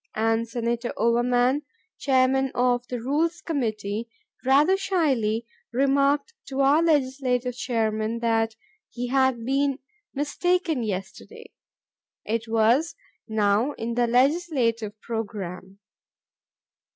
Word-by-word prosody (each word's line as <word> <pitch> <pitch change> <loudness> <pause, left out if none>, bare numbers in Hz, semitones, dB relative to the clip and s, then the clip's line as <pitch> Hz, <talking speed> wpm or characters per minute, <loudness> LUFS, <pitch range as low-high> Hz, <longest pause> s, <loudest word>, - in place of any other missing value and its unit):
And 225 +1 +1
Senator 235 +1 -2
Overman, 245 +4 +2 0.4
Chairman 265 0 +2
of 245 0 +1
the 245 - -4
Rules 305 +8 0
Committee, 220 -6 -3 0.3
rather 285 +8 +4
shyly 275 - 0 0.3
remarked 275 - +2
to 270 0 -2
our 280 +4 +5
legislative 260 -5 +1
chairman 225 -3 -1
that 225 -1 0 0.3
he 245 0 -5
had 260 -3 +2
been 275 +1 +1 0.4
"mistaken 325 +1 0
yesterday." 195 -4 -6 0.7
It 225 +1 -2
was 230 +8 +2 0.3
"now 220 +4 +1
in 230 -1 -4
the 240 0 +2
legislative 245 -5 +1
program." 195 -4 -5
245 Hz, 100 wpm, -25 LUFS, 225-275 Hz, 0.7 s, our